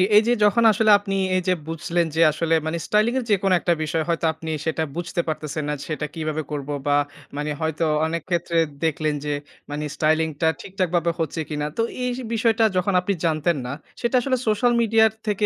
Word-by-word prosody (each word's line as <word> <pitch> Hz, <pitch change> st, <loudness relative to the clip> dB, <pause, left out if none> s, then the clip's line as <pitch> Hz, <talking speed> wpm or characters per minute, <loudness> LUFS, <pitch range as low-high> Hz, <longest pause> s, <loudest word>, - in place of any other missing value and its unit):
এই 210 Hz, -, +9 dB
যে 240 Hz, -, +4 dB
যখন 210 Hz, +3 st, +4 dB
আসলে 215 Hz, +1 st, +3 dB
আপনি 195 Hz, -1 st, -3 dB, 0.2 s
এই 185 Hz, -, +2 dB
যে 185 Hz, -, +4 dB
বুঝলেন 170 Hz, +1 st, -1 dB
যে 165 Hz, -, +2 dB
আসলে 165 Hz, +2 st, -1 dB
মানে 160 Hz, +1 st, -1 dB
স্টাইলিং 215 Hz, +3 st, +2 dB
এর -, -, -3 dB
যেকোনো 195 Hz, -1 st, +3 dB
একটা 175 Hz, -, +2 dB
বিষয় 160 Hz, +1 st, -1 dB
হয়তো 165 Hz, 0 st, 0 dB
আপনি 160 Hz, 0 st, -8 dB, 0.2 s
সেটা 160 Hz, 0 st, 0 dB
বুঝতে 175 Hz, +1 st, -2 dB
পারতেছেন 155 Hz, -1 st, -3 dB
না, -, -, 0 dB, 0.2 s
সেটা 150 Hz, 0 st, -2 dB
কিভাবে 155 Hz, -1 st, -2 dB
করব। 145 Hz, -1 st, -4 dB, 0.2 s
বা 145 Hz, -, +4 dB, 0.4 s
মানে 150 Hz, +1 st, -2 dB
হয়তো 160 Hz, +1 st, 0 dB, 0.2 s
অনেক 165 Hz, +1 st, -2 dB
ক্ষেত্রে 170 Hz, -1 st, 0 dB, 0.3 s
দেখলেন 155 Hz, -1 st, 0 dB
যে, 150 Hz, -, -1 dB, 0.4 s
মানে 150 Hz, +1 st, -3 dB
স্টাইলিং 160 Hz, +1 st, +2 dB
টা 160 Hz, -, +4 dB
ঠিকঠাক 185 Hz, -2 st, -2 dB
ভাবে 170 Hz, 0 st, +2 dB
হচ্ছে 160 Hz, 0 st, -2 dB
কিনা। 150 Hz, -1 st, -2 dB
তো -, -, +2 dB, 0.2 s
এই 250 Hz, -, 0 dB, 0.2 s
বিষয়টা 225 Hz, 0 st, +2 dB
যখন 185 Hz, +2 st, +1 dB
আপনি 200 Hz, +3 st, 0 dB
জানতেন 160 Hz, 0 st, +1 dB
না, 125 Hz, -, -4 dB, 0.3 s
সেটা 235 Hz, +1 st, 0 dB
আসলে 255 Hz, +1 st, 0 dB
সোশ্যাল 215 Hz, +3 st, +3 dB
মিডিয়ার 220 Hz, -1 st, +4 dB, 0.2 s
থেকে 210 Hz, 0 st, +1 dB
170 Hz, 200 wpm, -23 LUFS, 155-205 Hz, 0.4 s, এই